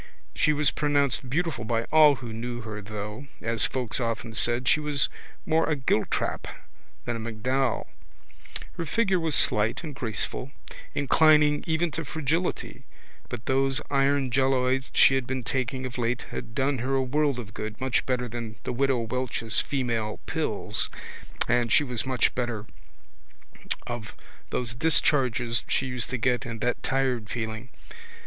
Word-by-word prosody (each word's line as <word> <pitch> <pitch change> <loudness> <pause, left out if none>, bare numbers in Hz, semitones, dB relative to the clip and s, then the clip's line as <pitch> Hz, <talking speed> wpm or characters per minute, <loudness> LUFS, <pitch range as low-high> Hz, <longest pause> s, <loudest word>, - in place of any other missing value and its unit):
She 155 - +3
was 150 -2 +2
pronounced 140 -3 +1
beautiful 150 -4 -1
by 115 0 0
all 155 -2 +7
who 120 -4 -7
knew 120 +2 -4
her 110 -2 -6
though, 105 +5 -6
as 115 -1 +2
folks 125 -3 -1
often 115 -1 -2
said, 120 +2 +2
she - - +5
was 150 -2 +1 0.4
more 160 +1 +2
a 150 - +2
Giltrap 130 -5 0 0.6
than 120 - -1
a - - -6
MacDowell. 115 +2 -1 0.9
Her 165 - -2
figure 195 +1 +2
was 160 -3 +1
slight 105 +8 +2
and 155 -3 -5
graceful, 125 +1 -3 0.4
inclining 150 +1 +4
even 165 +1 +1
to 165 - -3
fragility 160 +4 -2 0.5
but 120 -1 -6
those 135 0 +3
iron 140 -1 +2
jelloids 130 0 +2
she - - +7
had 135 -2 0
been 130 -1 -2
taking 130 +1 -2
of 130 -1 -5
late 120 +1 0
had 115 - -6
done 135 -1 +1
her 130 +3 0
a 135 - +2
world 145 +1 +1
of 105 -4 -7
good 110 0 -5
much 130 -1 +1
better 125 -1 0
than 115 -2 -6
the - - -2
Widow 135 -1 +2
Welch's 115 -1 0
female 115 -6 -1
pills - - -2 0.6
and 120 -1 +2
she 150 - +6
was 125 -2 -3
much 130 -2 +2
better 120 -4 -2 1.2
of 120 -3 -6 0.3
those 120 -2 -1
discharges 125 -4 +2
she 130 - +1
used 125 -2 -2
to 130 - -1
get 125 +2 +1
and 115 -3 -6
that 120 +2 0
tired 130 -5 0
feeling. 110 +1 -4
125 Hz, 155 wpm, -27 LUFS, 115-140 Hz, 1.2 s, all